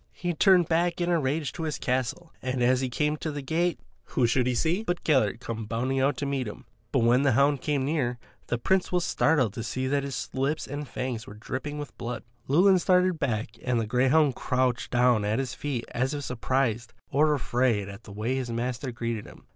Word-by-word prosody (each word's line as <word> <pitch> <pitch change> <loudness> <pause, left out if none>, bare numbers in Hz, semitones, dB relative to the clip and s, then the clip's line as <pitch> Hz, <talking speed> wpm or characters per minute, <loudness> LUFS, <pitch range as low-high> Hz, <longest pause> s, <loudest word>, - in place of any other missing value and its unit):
He 175 0 -2
turned 180 0 +5
back 170 +1 +1
in 175 0 +1
a 170 - +3
rage 145 0 -1
to - - -6
his 155 -2 -2
castle, 130 +7 -2
and 130 -1 -1
as 130 +1 +3
he 130 - -1
came 150 +4 0
to 155 - -3
the 145 -1 -5
gate, 170 +5 0 0.3
who 125 - +1
should 125 +2 +2
he 125 - +1
see 170 - +1
but 175 -5 -2
Gellert 130 -8 +2
come 115 -2 -5
bounding 125 +4 -1
out 135 0 +2
to 145 - -2
meet 135 -3 -1
him. 105 - -9 0.3
But - - +2
when 120 +3 +4
the 140 -2 +3
hound 140 +2 +3
came 140 -3 0
near 145 -3 +1
him, - - -14 0.3
the 120 - 0
Prince 190 +10 +1
was 180 -1 +1
startled 135 -9 +2
to 115 - -5
see 130 +3 -3
that 140 +2 +1
his 135 -4 -4
lips 135 +4 -1
and 145 +1 -5
fangs 125 -4 -4
were 105 - -9
dripping 130 +7 -5
with 145 -1 -7
blood. 120 -1 -4 0.2
Llewelyn 185 +7 +5
started 180 -1 +3
back 115 -6 -1
and 125 -2 +1
the 115 - 0
greyhound 135 +5 +3
crouched 125 0 0
down 120 -3 +3
at 105 +2 0
his 130 -2 -2
feet 135 -5 -3
as 130 +4 -1
if 145 - -4
surprised 125 -2 -1 0.2
or 150 +2 +4
afraid 120 -4 +1
at 100 +2 -10
the 105 - -10
way 110 +6 -2
his 130 -2 -3
master 125 +2 -2
greeted 115 -2 -4
him. - - -15
130 Hz, 225 wpm, -27 LUFS, 120-150 Hz, 0.3 s, turned